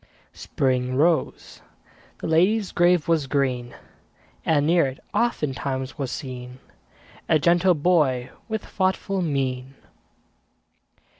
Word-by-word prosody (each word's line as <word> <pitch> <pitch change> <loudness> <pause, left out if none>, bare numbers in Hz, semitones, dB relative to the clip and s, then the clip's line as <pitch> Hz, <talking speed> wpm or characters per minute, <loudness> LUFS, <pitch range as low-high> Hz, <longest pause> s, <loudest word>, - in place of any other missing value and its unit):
Spring 130 -1 -1
rose; 160 +4 0 0.6
the - - -3
lady's 185 +6 +2
grave 175 -2 +3
was 160 -4 +1
green; 130 -3 -1 0.7
And 145 -3 +2
near 170 -2 +3
it, 130 0 -7
oftentimes, 140 - -1
was 135 -2 -3
seen 125 -2 -7 0.7
A 155 - +5
gentle 175 +4 +3
boy 145 -6 +1 0.2
with 220 -1 -3
thoughtful 190 0 -1
mien. 135 -4 -2
145 Hz, 100 wpm, -24 LUFS, 130-175 Hz, 0.7 s, A